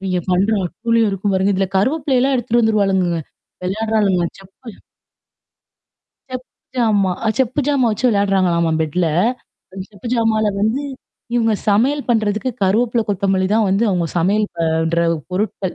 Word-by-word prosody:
இவங்க 185 -2 -1
பண்ற 185 +4 +2 0.2
அட்டூழியும் 225 +4 0
இருக்கும் 195 +1 -2
பாருங்க. 190 +1 +2
இதில 190 0 0
கருவேப்பிலைலாம் 270 +3 +1
எடுத்துகிட்டு 240 0 +1
வந்துருவாளுங்கங்க. 195 -6 +1 0.4
விளையாடுறாளுங்கலாம். 200 -3 0
செப்பு 195 +5 -13 1.6
செப் 255 0 -6 0.3
ஜாமா, 210 -6 +2
அ, - - +2
செப்பு 260 +2 +1
ஜாமா 280 -4 +2
வச்சு 220 +4 0
விளையாடுறாங்களாம்மா 190 -6 +2
பெட்ல. 160 +3 0 0.7
அந்த 190 0 -6
செப்பு 205 +2 -9
ஜாமால 225 -2 +1
வந்து 225 +7 0 0.5
இவுங்க 225 -2 +2
சமையல் 260 +8 +2
பண்ணுறதுக்கு 220 +1 0
கருவேப்பில, 230 +4 +2
கொத்தமல்லி 195 -1 +1
தான் 220 -1 +3
வந்து 195 +4 +2
அவுங்க 175 -3 0
சமையல் 205 +5 +1
பண்ற 160 0 0 0.3
பொருட்கள். 190 -1 -2
205 Hz, 130 wpm, -18 LUFS, 190-230 Hz, 1.6 s, தான்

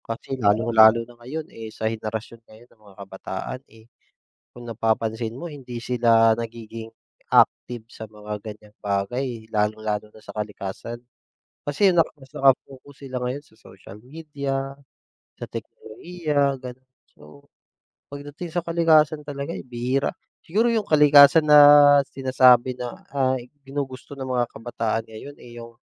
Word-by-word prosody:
Kasi 115 +4 -6
lalong-lalo 110 0 +4
na 120 - -16
ngayon, 150 +6 -6
eh, 110 -1 -8
sa 110 - -6
henerasyon 110 +1 -4
ngayon 110 +2 -17
ng 110 - -31
mga 100 -2 -18
kabataan, 95 +6 -7
eh, 110 0 -19 0.7
kung 120 0 -12
napapansin 115 +1 -2
mo 175 - -6
hindi 135 -6 -8
sila 115 -2 +3
nagiging 115 -1 -8 0.4
active 120 -2 +2
sa 110 - -9
mga 105 0 -9
ganyang 105 -1 -11
bagay. 110 +4 -3
Lalong-lalo 105 0 -2
na 110 - -18
sa - - -11
kalikasan. 105 +2 -6 0.7
Kasi 150 +8 +2
naka 170 -3 +2
mas 135 -3 -18
naka-focus 135 +1 0
sila 130 -1 -5
ngayon 130 +3 -3
sa 145 -7 -26
social 105 -3 -14
media, 135 +1 -5 0.6
sa - - -6
teknolohiya, 145 +1 -3
gano'n. 130 0 -11 0.2
So, 75 -1 -17 0.6
pagdating 145 +4 -8
sa 175 +1 -3
kalikasan 160 -2 +3
talaga, 145 +1 -6
eh, - - -6
bihira. 125 +2 -2 0.3
Siguro 225 +7 +1
'yong 220 -3 -1
kalikasan 150 0 +7
na 145 -1 +8
sinasabi 130 -1 +4
na, 125 -1 -8
ah, 130 -2 +1 0.2
ginugusto 135 0 -7
ng 135 - -5
mga 125 -2 0
kabataan 115 -1 -3
ngayon, 115 +6 -11
eh, 120 - -14
'yong 115 0 -13
125 Hz, 140 wpm, -23 LUFS, 110-140 Hz, 0.7 s, na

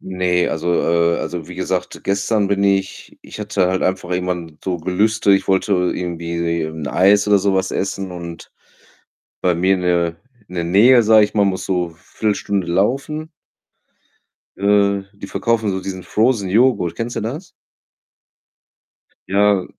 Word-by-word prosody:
Ne, 90 -1 0
also, 85 +2 -1
äh 85 0 +2
also, 85 -3 -5
wie - - -8
gesagt, - - -3
gestern 100 +1 0
bin 100 0 0
ich 95 -1 -1
ich - - -10
hatte 100 -3 0
halt 95 0 -1
einfach 95 -1 -1
irgendwann 90 -3 -3
so 90 -2 -2
Gelüste, 100 +5 +1
ich 95 - -1
wollte 95 +2 +1
irgendwie 85 -2 -1
'n 80 -1 -6
Eis 100 +7 +3
oder 105 -1 +4
so 100 0 +1
was 95 0 0
essen 95 -1 -3
und 85 -1 -9 0.9
bei 90 -1 +2
mir 95 +3 +2
in 90 - -4
der 85 -2 +1 0.3
in 90 - -11
der 85 - -1
Nähe, 115 +8 +5
sage 110 -1 +6
ich - - -11
mal, 105 - +3
muss 95 -2 -1
so 90 -2 -1
Viertelstunde 100 +2 -3
laufen. 135 - -1 1.3
Äh, 100 0 +2
die 100 - -10
verkaufen 115 0 0
so 95 - -2
diesen 95 -1 -6
Frozen 110 +1 +1
Joghurt. 105 -5 +2
Kennst 115 +1 -4
du - - -2
das? 145 - -5 1.8
Ja, 100 -1 +3
95 Hz, 155 wpm, -19 LUFS, 90-105 Hz, 1.8 s, sage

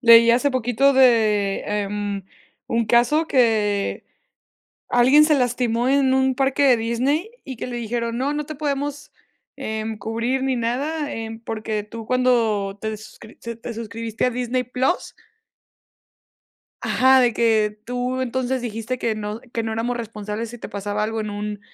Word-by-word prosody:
Leí 230 -1 +8
hace 250 +5 +3
poquito 255 +2 +2
de, 215 -6 +3
em, 205 -1 -2 0.4
un 230 -1 0
caso 245 +8 +3
que 215 -7 +1 0.9
alguien 260 +5 +6
se 305 -1 +4
lastimó 245 -2 0
en 275 -1 +3
un 265 0 +2
parque 270 +2 +1
de 260 -3 +6
Disney, 255 - 0
y 265 - -7
que - - -5
le 245 - -4
dijeron: 235 0 -2
"No, 275 +3 0
no 295 0 -3
te 310 - -7
podemos, 290 0 -3 0.4
em, 220 0 -4
cubrir 230 +5 -2
ni 265 -1 +1
nada, 285 +6 -2
em, 225 0 -6
porque 220 -2 -4
tú 225 +2 -9
cuando 225 -6 +1
te 220 0 -3
suscri 215 +1 -14
se 235 0 -6
te 230 +1 -7
suscribiste 230 +1 -3
a - - +3
Disney 250 +1 -1
Plus" 255 +7 -1 1.7
Ajá, 260 0 +5
de 245 -1 +3
que: 220 -2 +2
"Tú 250 +1 -2
entonces 260 +1 -1
dijiste 230 +1 -4
que 230 -2 -1
no 215 +1 -5
que 230 - -1
no 225 0 -3
éramos 235 +2 -1
responsables 215 -1 -5
si 240 - -9
te - - -7
pasaba 205 +1 -2
algo 225 +1 -2
en 215 - -4
un 205 0 -5
235 Hz, 160 wpm, -22 LUFS, 220-260 Hz, 1.7 s, Leí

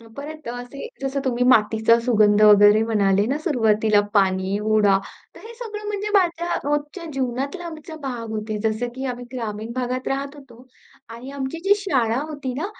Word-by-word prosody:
अ, 230 - -16
परत 305 -1 -8
असे 245 - -7 0.2
जसं 275 +1 -2
तुम्ही 250 -1 0
मातीचा 220 0 +4
सुगंध 215 -3 +3
वगैरे 210 +1 +7
म्हणाले 200 -3 +2
ना 275 +5 -1
सुरवातीला 220 - +2
पाणी, 190 0 +2
हुरडा. 210 -2 +3 0.4
तर - - -13
हे 465 - -10
सगळं 430 -3 -7
म्हणजे 415 0 -3
माझ्या 345 -3 +2
रोजच्या 295 +4 -2
जीवनातला 270 +6 -3
आमचा 315 -1 -9
भाग 240 -4 -5
होते, 215 0 -3
जसं 220 +3 -2
की 260 +1 -5
आम्ही 245 0 -9
ग्रामीण 225 -2 -5
भागात 255 0 -2
राहत 275 +2 -3
होतो 255 -3 -15 0.4
आणि 235 +4 -9
आमची 265 +4 -4
जी 400 +1 +5
शाळा 255 - 0
होती 285 -4 -5
ना, 300 +8 -3
250 Hz, 170 wpm, -22 LUFS, 220-290 Hz, 0.4 s, वगैरे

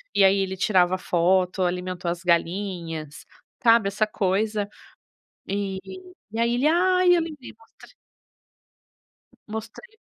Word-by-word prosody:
e - - +5
aí 195 +1 +5
ele 190 -1 -1
tirava 185 -2 +3
a - - -4
foto, 185 +2 +1
alimentou 180 0 -2
as 170 -1 -5
galinhas, 170 -3 -2 0.4
sabe, 230 -3 +5
essa 210 +2 0
coisa. 205 +1 -1 0.8
E 195 -1 -2 0.5
e 225 - -5
aí 235 +1 +2
ele: 250 +4 +1
"Ai, 365 +2 +3
eu 340 - +2
lembrei", 305 -5 -8
mostrei 225 - -19 1.5
Mostrei 225 - -8
195 Hz, 125 wpm, -24 LUFS, 180-225 Hz, 1.5 s, e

